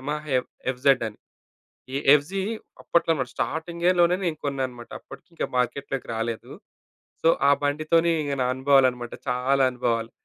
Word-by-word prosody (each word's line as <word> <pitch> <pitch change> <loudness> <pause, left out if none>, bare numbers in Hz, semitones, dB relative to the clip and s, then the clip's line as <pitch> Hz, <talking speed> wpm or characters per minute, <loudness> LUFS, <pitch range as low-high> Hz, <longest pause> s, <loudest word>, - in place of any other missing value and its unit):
Yamaha 150 +3 -4
F 125 - -6 0.2
FZ 130 -1 +2
అని. 105 - -14 0.8
ఈ - - 0 0.2
FZ 155 +7 +1 0.4
అప్పట్లో 170 -1 +1
మరి 130 -2 -2
స్టార్టింగ్‌లోనే 170 +2 +1
నేను 160 -3 -2
కొన్నానన్నమాట. 130 -4 -4
అప్పటికి 135 - -14
ఇంకా - - -2
మార్కెట్‌లోకి 135 +1 -2
రాలేదు. 115 0 -4 0.7
సో, 165 - +5 0.2
ఆ - - +7
బండితని 155 +4 +2
ఇగ 145 -1 -2
నా - - +1
అనుభవాలన్నమాట. 130 -3 +2 0.2
చాలా 130 +2 +2
అనుభవాలు. 115 -2 -1
140 Hz, 135 wpm, -25 LUFS, 125-155 Hz, 0.8 s, ఆ